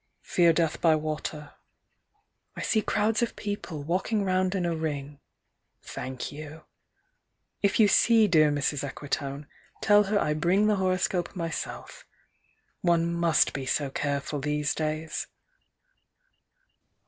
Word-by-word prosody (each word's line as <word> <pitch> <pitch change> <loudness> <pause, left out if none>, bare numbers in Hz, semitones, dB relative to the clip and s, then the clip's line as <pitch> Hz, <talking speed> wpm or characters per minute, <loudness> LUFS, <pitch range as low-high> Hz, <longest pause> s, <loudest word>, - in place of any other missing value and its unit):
Fear 170 -2 +3
death 165 -1 0
by 160 -2 +5
water. 155 -1 -4 1.0
I - - -5
see 220 - +2
crowds 215 +3 +1
of 235 - -1
people, 195 -7 -5
walking 190 +6 0
round 185 0 +1
in 180 -2 0
a 170 -1 0
ring. 145 -3 -4 0.6
Thank 130 0 -6
you. 155 +1 -9 1.0
If 200 +1 +1
you 215 - +7
see 225 +1 +5
dear 155 -5 +5
Mrs. 145 -1 -1
Equitone, 140 0 -4 0.3
Tell 205 0 +5
her 205 +2 +1
I 150 - +1
bring 175 +7 +2
the 210 -1 +2
horoscope 185 -1 0
myself: 165 -3 -5 0.8
One 170 -1 +2
must 170 -2 +2
be 135 -2 -5
so 140 +1 0
careful 140 +1 -2
these 150 +1 -1
days. 155 0 -3
165 Hz, 125 wpm, -27 LUFS, 150-185 Hz, 1.0 s, you